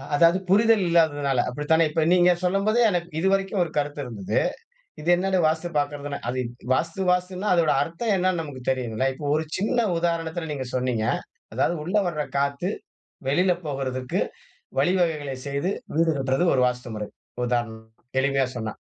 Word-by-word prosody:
அதாவது 170 +4 +5
புரிதல் 220 +1 +5
இல்லாததனால. 145 -6 +2
அப்படித்தானே? 150 +5 +2
இப்ப 160 +1 +1
நீங்க 180 0 +5
சொல்லும் 195 +2 +1
போதே 235 +3 +3
எனக்கு 175 0 -2
இதுவரைக்கும் 195 +2 +1
ஒரு 170 - -6
கருத்து 145 0 -1
இருந்துது. 105 -6 -2 0.6
இது 165 - -2
என்னது 190 +1 +1
வாஸ்து 160 +2 -1
பார்க்கறதுனா? 145 0 -2
அது 130 - -2 0.3
வாஸ்து 165 +7 -1
வாஸ்துனா, 180 +2 -1
அதோட 165 -3 +3
அர்த்தம் 185 +8 -2
என்னான்னு 185 -2 +1
நமக்கு 145 -5 -8
தெரியனும்ல. 130 -1 0
இப்போ 150 - -7
ஒரு 155 +1 0
சின்ன 225 +3 +1
உதாரணத்துல 165 -1 -2
நீங்க 130 -3 -4
சொன்னீங்க. 125 -3 0 0.5
அதாவது 175 - +1
உள்ள 180 +6 -3
வர்ற 155 -3 -2 0.2
காத்து 140 +5 0 0.6
வெளியில 180 +7 +3
போகறதுக்கு 130 -3 -2 0.6
வழிவகைகளை 155 -3 +1
செய்து, 140 +7 -1 0.3
வீடு 165 0 +4
கட்றது 135 +4 +1
ஒரு 130 - +3
வாஸ்துமுறை. 120 -4 -3 0.4
உதாரணம் 115 -2 -2 0.3
எளிமையா 135 -1 +2
சொன்னா. 110 -2 -4
155 Hz, 145 wpm, -25 LUFS, 135-180 Hz, 0.6 s, அதாவது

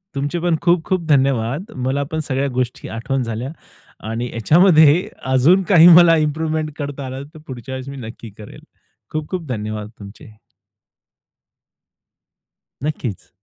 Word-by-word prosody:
तुमचे 145 +5 -2
पण 170 -1 +1
खूप-खूप 175 +1 +1
धन्यवाद. 135 - +1
मला 130 +2 -1
पण 160 - -2
सगळ्या 135 +1 -1
गोष्टी 125 -1 -3
आठवण 125 +3 -2
झाल्या 115 +4 -4 0.6
आणि 120 +2 -3
याच्यामध्ये 160 - +4 0.3
अजून 170 +9 +4
काही 170 -3 +7
मला 175 -1 +7
इम्प्रूव्हमेंट 155 0 -1
करता 140 -2 -5
आलं 130 +1 -6
तर 155 - -12
पुढच्या 130 0 -8
वेळेस 130 +1 -7
मी 140 - -8
नक्की 115 0 -10
करेल. 105 - -12 0.5
खूप-खूप 155 +2 -4
धन्यवाद 105 -3 -5
तुमचे. 105 +1 -13 2.5
नक्कीच. 135 -9 -4
140 Hz, 125 wpm, -19 LUFS, 125-160 Hz, 2.5 s, काही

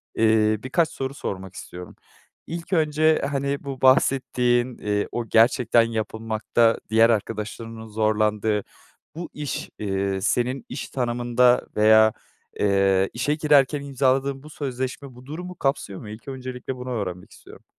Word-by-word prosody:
eee, 110 -1 +3
birkaç 155 +5 +1
soru 135 0 -5
sormak 95 -8 -6
istiyorum. 90 0 -9 0.5
İlk 170 +3 -6
önce, 155 -1 +3
hani, 140 0 -2
bu 135 -2 -6
bahsettiğin, 125 -2 +3
eee, 105 0 -1
o 120 -1 -3
gerçekten 115 +1 +4
yapılmakta 115 0 0
diğer 115 +1 +5
arkadaşlarının 110 +1 -4
zorlandığı 105 -1 0 0.5
bu 175 +1 -6
iş, 145 -2 -5
eee, 95 -1 -1
senin 125 +4 0
iş 130 - -6
tanımında 120 0 +2
veya, 110 0 +6 0.5
eee, 95 -1 +3
işe 140 +5 0
girerken 145 -2 +3
imzaladığın 135 0 0
bu 150 - -11
sözleşme 130 -2 -5
bu 125 - -14
durumu 180 +5 -7
kapsıyor 135 -10 -2
mu? 105 - -9
İlk 110 +5 -11
öncelikle 130 -1 -6
bunu 125 0 -6
öğrenmek 90 -6 -4
istiyorum. - - -16
120 Hz, 130 wpm, -24 LUFS, 110-135 Hz, 0.5 s, veya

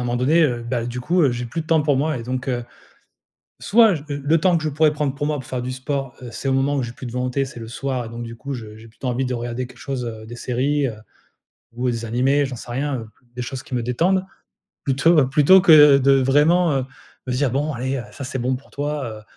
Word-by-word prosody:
moment 120 0 -1
donné, 150 +7 +3
heu, 120 -5 -1
bah, 120 -1 -2
du 120 +1 -4
coup, 175 +6 +2
heu, 135 -4 +3
j'ai 120 0 -4
plus 165 +8 -4
de - - -19
temps 160 -1 +3
pour 145 -2 +2
moi 155 +1 0
et - - -6
donc, 130 +2 -3
heu, 120 -2 -1 1.0
soit, 215 0 +5
j 150 - -7
le 145 +3 +1
temps 175 +1 +3
que 155 - -5
je 155 - 0
pourrais 155 +1 +2
prendre 150 -2 -1
pour 145 +1 -2
moi 150 -1 -1
pour 130 - -9
faire 130 -1 -3
du 125 - -3
sport, 135 0 -4
heu, 120 - -7
c'est 135 - -5
au 135 - +2
moment 135 +2 +1
où 135 - 0
j'ai 120 0 -6
plus 130 - -10
de - - -7
volonté, 125 +2 -1
c'est 125 - -10
le 115 - -7
soir 130 0 -3
et - - -8
donc 115 +1 -6
du 115 0 -8
coup, 140 +3 -6
je 110 -3 -8
j'ai 110 +1 -13
plutôt 115 +4 -7
envie 125 +2 -1
de 125 - -2
regarder 120 +1 -4
quelque 130 -1 -17
chose, 130 -2 -4
heu, 110 -2 -7
des 120 - -8
séries, 135 +4 0
heu, 115 - -5 0.8
ou 125 +1 -1
des 115 -1 -4
animés, 135 +5 +2
j'en 130 - -6
sais 120 - -10
rien, 135 +1 -1
heu, 110 - -10 0.3
des 125 - -3
choses 130 +1 -6
qui - - -7
me 120 - -1
détendent 175 +10 +1 0.6
plutôt 145 +2 +4
plutôt 150 +7 +6
que 150 -5 +8
de 140 +1 +4
vraiment, 155 +6 +4
heu, 130 - -2 0.4
me 130 - -2
dire: 130 +1 +1
«Bon 145 +4 0
allez, 130 +1 -2
heu, - - -4
ça - - -9
c'est 130 +1 -4
bon 125 +1 0
pour 140 - -16
toi, 145 0 -3 0.2
heu, - - -18
135 Hz, 270 wpm, -21 LUFS, 120-145 Hz, 1.0 s, que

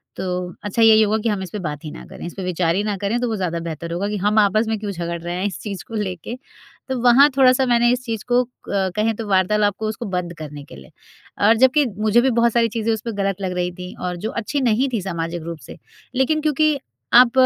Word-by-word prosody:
तो 180 -1 -3
अच्छा 205 +2 -1
यही 220 -1 +7
होगा 215 0 +2
कि 230 - +1
हम 205 -3 -1
इस 185 - -7
पे 210 - -4
बात 150 -5 -5
ही 150 - -5
ना - - -10
करें, - - -10
इस 175 - -6
पे 195 - -6
विचार 175 -2 0
ही 200 - 0
ना 210 -1 -1
करें 205 +5 -1
तो 245 - 0
वो 225 - -1
ज़्यादा 180 -4 -2
बेहतर 165 0 -6
होगा 185 +4 -1
कि 210 - -2
हम 210 +2 +2
आपस 215 +2 +3
में 220 0 0
क्यों 205 -1 -4
झगड़ 170 -2 -4
रहे 175 +1 -4
हैं 185 +2 -2
इस 195 - -6
चीज़ 200 -4 -6
को 225 - -7
लेके।" 200 +1 -4 0.5
तो 260 - -1
वहाँ 250 +4 +7
थोड़ा-सा 260 0 +5
मैंने 240 -1 +3
इस 250 0 -3
चीज़ 225 -3 -3
को 245 0 +3 0.2
क 190 -2 0
कहें 215 +1 +1
तो 220 0 -6
वार्तालाप 205 +2 +2
को 220 - -2
उसको 220 +2 -4
बंद 175 -1 -3
करने 150 -2 -8
के - - -13
लिए, 65 -1 -14 0.6
और 225 - +6
जबकि 260 +4 +4
मुझे 215 +2 +3
भी 265 - +2
बहुत 235 -1 +3
सारी 235 -1 +3
चीज़ें 225 0 -1
उसपे 230 +1 -4
गलत 195 0 -2
लग 190 -1 -2
रही 180 0 -1
थीं 180 0 -7
और 180 0 -2
जो - - 0
अच्छी 235 +5 -2
नहीं 250 +2 +2
थी 225 - 0
सामाजिक 170 -2 -4
रूप 170 0 -6
से, 130 - -12 0.4
लेकिन 265 +4 +2
क्योंकि 305 0 +2 0.4
आप 245 0 +8
210 Hz, 260 wpm, -21 LUFS, 180-235 Hz, 0.6 s, आप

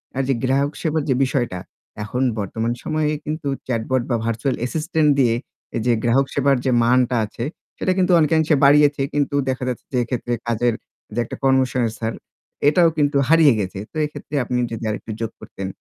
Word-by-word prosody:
আর 135 - +1
যে 135 - +2
গ্রাহক 135 +2 +1
সেবার 160 -1 0
যে 130 - +3
বিষয়টা 120 -8 -1 0.4
এখন 125 +5 -2 0.2
বর্তমান 110 +3 -2
সময়ে 155 -1 0
কিন্তু 155 0 -4 0.2
চ্যাটবট 125 +1 0
বা 120 - +2
ভার্চুয়াল 115 +4 -1
অ্যাসিস্টেন্ট 155 +5 0
দিয়ে 120 -3 +3 0.4
এ - - +1
যে 120 - +4
গ্রাহক 125 +4 +3
সেবার 140 0 +3
যে 130 - +2
মানটা 125 +1 +3
আছে 110 +2 -7 0.3
সেটা 185 - 0
কিন্তু 185 -1 +2
অনেকাংশে 160 0 +3
বাড়িয়েছে। 145 0 +5
কিন্তু 145 -1 0
দেখা 130 0 -2
যাচ্ছে 125 - -5
যে, - - +1
এক্ষেত্রে 120 0 -3
কাজের 120 +1 +1 0.5
একটা 115 - -7
কর্মসংস্থান 125 -4 +1 0.6
এটাও 170 +2 +4
কিন্তু 145 -1 +2
হারিয়ে 160 -4 +6
গেছে। 95 -1 -3
তো - - -8
এক্ষেত্রে 150 0 -8
আপনি 125 +1 -2
যদি 115 0 -5
আরেকটু 110 +1 -5
যোগ 115 -1 -2
করতেন। 95 - -7
130 Hz, 170 wpm, -21 LUFS, 120-150 Hz, 0.6 s, হারিয়ে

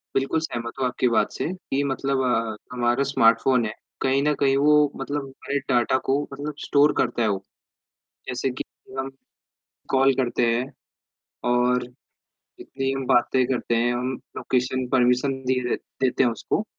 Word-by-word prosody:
बिल्कुल 135 +4 +1
सहमत 120 -7 -4
हूँ 130 - +1
आपकी 125 0 0
बात 115 - +2
से, - - -3
कि 155 -7 -2
मतलब 135 -1 -1
अ, 115 -3 0 0.2
हमारा 120 +2 +1
स्मार्टफ़ोन 125 -1 +3
है, 105 - -3 0.3
कहीं 135 +1 +2
न 150 0 +3
कहीं 135 -1 +3
वो 150 0 +4
मतलब 145 0 -3
हमारे 135 +1 -4
डाटा 125 +1 +3
को 140 +2 +2
मतलब 145 +2 -5
स्टोर 145 +1 +4
करता 120 -1 0
है 110 - +3
वो। 95 -1 -2 0.8
जैसे 130 +1 -1
कि 125 - -5 0.3
हम, 135 0 -2 0.8
कॉल 135 0 +4
करते 125 -2 +1
हैं 125 +4 -2 0.8
और 125 0 +2 0.8
जितनी 135 0 -3
हम 135 -1 -3
बातें 125 +1 +3
करते 125 -2 -1
हैं 120 +1 +2
हम 125 +1 -2 0.3
लोकेशन 130 0 -1
परमिशन 125 +1 +3
दी 130 0 +1
दे - - +1 0.3
देते 130 0 +2
हैं 120 - +3
उसको। 115 - -2
130 Hz, 160 wpm, -24 LUFS, 120-135 Hz, 0.8 s, वो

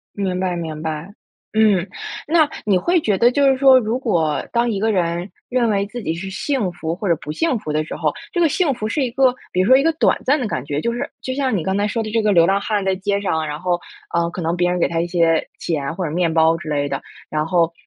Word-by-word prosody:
明 190 -3 -2
白 185 -1 -1
明 160 -3 -5
白， 160 +2 -4 0.4
嗯。 210 -4 +3 0.4
那 315 0 +4 0.2
你 200 -3 +3
会 345 - +2
觉 210 -8 +1
得 240 +5 +5
就 280 +1 +3
是 265 -1 +3
说， 265 -1 +7
如 230 0 -1
果 165 - 0
当 235 0 +1
一 205 -4 -1
个 220 +2 +1
人 175 -1 -1 0.2
认 245 -2 +1
为 200 -1 +1
自 240 +2 -7
己 160 - -1
是 185 +4 -6
幸 210 0 -1
福 165 -1 -4
或 195 +3 -4
者 170 - +4
不 150 - -6
幸 280 - 0
福 155 -6 -5
的 155 0 +1
时 155 - -7
候， - - 0 0.2
这 350 - -1
个 340 - +5
幸 315 0 +1
福 215 -2 -3
是 255 +7 -1
一 255 - -1
个， 260 0 +3 0.2
比 180 - -1
如 185 - +1
说 260 - +7
一 265 - +5
个 330 - +3
短 315 - +2
暂 290 +3 +2
的 250 - -2
感 130 - -3
觉， 145 0 -2
就 235 - -1
是 240 - -3
就 260 - -3
像 260 -4 0
你 170 - -3
刚 190 +3 -1
才 205 +1 +1
说 225 +2 -2
的 215 - -5
这 225 +1 +2
个 210 -1 +2
流 170 -4 +5
浪 195 +3 +2
汉 205 -2 -1
在 190 0 +1
街 200 +1 -1
上， 160 -5 -1
然 150 0 -4
后 175 0 0 0.3
呃， 170 0 +1
可 175 - -8
能 165 +1 0
别 175 0 +1
人 180 0 -1
给 - - +3
他 165 0 -1
一 170 - -2
些 165 -2 +2
钱 150 -3 -2
或 185 0 -2
者 150 - -3
面 170 0 +1
包 160 0 +4
之 165 -2 -8
类 145 -1 0
的， - - -3 0.3
然 155 0 -1
后， 170 -1 +2
190 Hz, 300 characters per minute, -20 LUFS, 165-235 Hz, 0.4 s, 说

